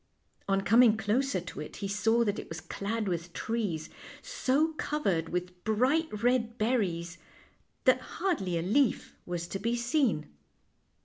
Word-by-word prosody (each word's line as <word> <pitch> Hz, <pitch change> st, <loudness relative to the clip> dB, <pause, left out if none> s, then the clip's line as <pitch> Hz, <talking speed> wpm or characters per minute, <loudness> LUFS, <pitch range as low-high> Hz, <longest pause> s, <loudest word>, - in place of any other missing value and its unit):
On 195 Hz, 0 st, +2 dB
coming 225 Hz, +2 st, +5 dB
closer 220 Hz, +1 st, +1 dB
to 175 Hz, -, -8 dB
it 150 Hz, -, -7 dB
he 200 Hz, -, -4 dB
saw 225 Hz, +4 st, +2 dB
that 205 Hz, -2 st, -1 dB
it -, -, -8 dB
was 165 Hz, -, -5 dB
clad 205 Hz, +6 st, -3 dB
with 170 Hz, -1 st, -3 dB
trees, 205 Hz, -9 st, -2 dB, 0.4 s
so 315 Hz, -, +1 dB
covered 200 Hz, -, -1 dB
with 180 Hz, 0 st, -4 dB
bright 250 Hz, +2 st, +1 dB
red 240 Hz, -1 st, +2 dB
berries 180 Hz, -8 st, 0 dB, 0.6 s
that -, -, +4 dB, 0.2 s
hardly 195 Hz, -, 0 dB
a 165 Hz, -, -1 dB
leaf 240 Hz, +7 st, +1 dB
was 175 Hz, -1 st, -3 dB
to 195 Hz, -, -3 dB
be 230 Hz, +4 st, 0 dB
seen. 240 Hz, -, +1 dB
215 Hz, 145 wpm, -30 LUFS, 180-245 Hz, 0.6 s, coming